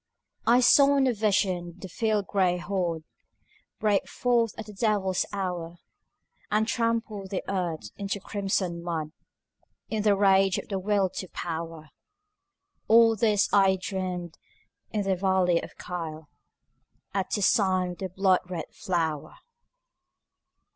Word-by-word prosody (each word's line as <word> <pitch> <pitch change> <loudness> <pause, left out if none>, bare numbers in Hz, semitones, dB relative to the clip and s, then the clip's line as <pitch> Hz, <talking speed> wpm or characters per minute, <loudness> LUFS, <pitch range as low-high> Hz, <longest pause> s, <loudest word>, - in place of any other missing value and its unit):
I 240 +2 +6
saw 280 +3 +6
in 270 - +3
a 255 - +2
vision 190 -5 0
the 190 - -8
field 210 +2 0
gray 185 -3 +1
horde 175 -3 -2 0.8
Break 210 -2 +1
forth 240 -3 0
at 220 - -6
the 210 - -11
devil's 195 -3 0
hour, 180 -4 -4 0.7
And 215 +1 +1
trample 230 -4 -1
the 190 -1 -3
earth 170 - -3
into 200 0 -3
crimson 190 -4 -2
mud 160 -3 -3 0.8
In 220 -1 -1
the 205 -1 +4
rage 195 -1 +4
of - - -6
the 195 -2 -2
Will 200 0 +1
to 190 - -6
Power, 165 -3 -6 1.0
All 225 0 +6
this 210 -1 +2
I 195 -1 +5
dreamed 180 -3 -4 0.5
in 210 -2 -1
the 195 -1 +1
valley 185 -2 +2
of - - -11
Kyll, 160 -3 -6 0.8
At 195 -1 -1
the 205 - -1
sign 185 -3 +2
of 175 - -9
the 190 - -4
blood 190 0 +3
red 170 -4 -6
flower. 165 -6 -2
190 Hz, 135 wpm, -27 LUFS, 175-210 Hz, 1.0 s, I